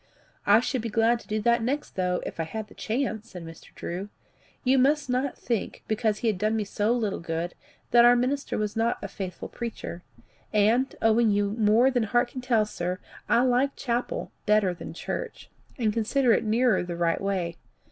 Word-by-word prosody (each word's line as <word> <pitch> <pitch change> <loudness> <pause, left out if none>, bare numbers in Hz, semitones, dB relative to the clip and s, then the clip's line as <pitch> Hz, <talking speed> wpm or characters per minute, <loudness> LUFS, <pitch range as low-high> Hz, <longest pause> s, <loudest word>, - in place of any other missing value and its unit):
"I 225 - +7
should 255 0 -1
be 230 - -3
glad 230 +2 +3
to - - -16
do 215 +1 -1
that 235 +2 +3
next 275 +6 -2
though, 180 -1 -1
if - - -7
I - - +1
had 215 +6 -6
the - - -14
chance," 225 -2 -2
said 180 -2 -8
Mr. 165 0 -12
Drew. 185 +4 -5 0.5
"You 265 +1 +4
must 280 0 +2
not 255 +2 -1
think, 230 -4 -3
because 220 -1 +1
he 235 - -2
has 210 - -1
done 215 +3 +1
me 220 - 0
so 205 +2 0
little 220 -5 0
good, 165 +1 -3 0.4
that 240 0 +7
our 240 0 +7
minister 260 +2 -1
is 210 - -3
not 230 +1 +1
a - - -2
faithful 190 -2 -6
preacher; 230 -7 -6 0.5
and, 225 +5 +2
owing 225 +1 +4
you 205 -1 +1
more 225 +4 +4
than 245 -2 +1
heart 240 +3 +2
can 255 - -6
tell, 235 -4 +2
sir, 180 -3 -3 0.3
I 235 - +5
like 260 +2 +2
chapel 245 -2 -2 0.2
better 210 -3 +4
than 175 - -9
church, - - -5 0.3
and 220 -4 +1
consider 235 +3 +2
it - - +1
nearer 225 -1 +3
the 175 -1 -5
right 170 -1 +1
way. 185 -4 -2
225 Hz, 200 wpm, -27 LUFS, 200-245 Hz, 0.5 s, I